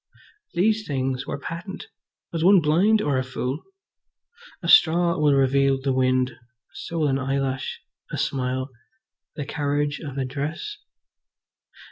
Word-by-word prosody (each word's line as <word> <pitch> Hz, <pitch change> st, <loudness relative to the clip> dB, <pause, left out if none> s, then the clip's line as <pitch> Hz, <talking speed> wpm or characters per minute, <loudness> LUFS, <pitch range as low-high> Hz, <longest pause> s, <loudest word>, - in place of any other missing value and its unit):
These 215 Hz, +4 st, +2 dB
things 130 Hz, -2 st, -2 dB
were -, -, -3 dB
patent. 170 Hz, +6 st, -7 dB, 0.5 s
Was 165 Hz, -1 st, -1 dB
one 190 Hz, +2 st, +7 dB
blind 180 Hz, +8 st, +3 dB
or 140 Hz, -3 st, +1 dB
a -, -, -1 dB
fool? 130 Hz, +2 st, -3 dB, 1.0 s
A -, -, -3 dB
straw 170 Hz, 0 st, +5 dB
will 150 Hz, -2 st, +4 dB
reveal 135 Hz, 0 st, +3 dB
the 135 Hz, 0 st, 0 dB
wind, 130 Hz, 0 st, +2 dB, 0.4 s
so 165 Hz, +3 st, -6 dB
will 150 Hz, -, +3 dB
an 135 Hz, -1 st, +1 dB
eyelash, 135 Hz, -1 st, -2 dB, 0.3 s
a -, -, -3 dB
smile, 130 Hz, 0 st, -2 dB, 0.6 s
the 145 Hz, -, -4 dB
carriage 145 Hz, 0 st, -1 dB
of 140 Hz, -4 st, -7 dB
a 135 Hz, -, 0 dB
dress. 150 Hz, -, -4 dB
140 Hz, 135 wpm, -24 LUFS, 130-165 Hz, 1.0 s, one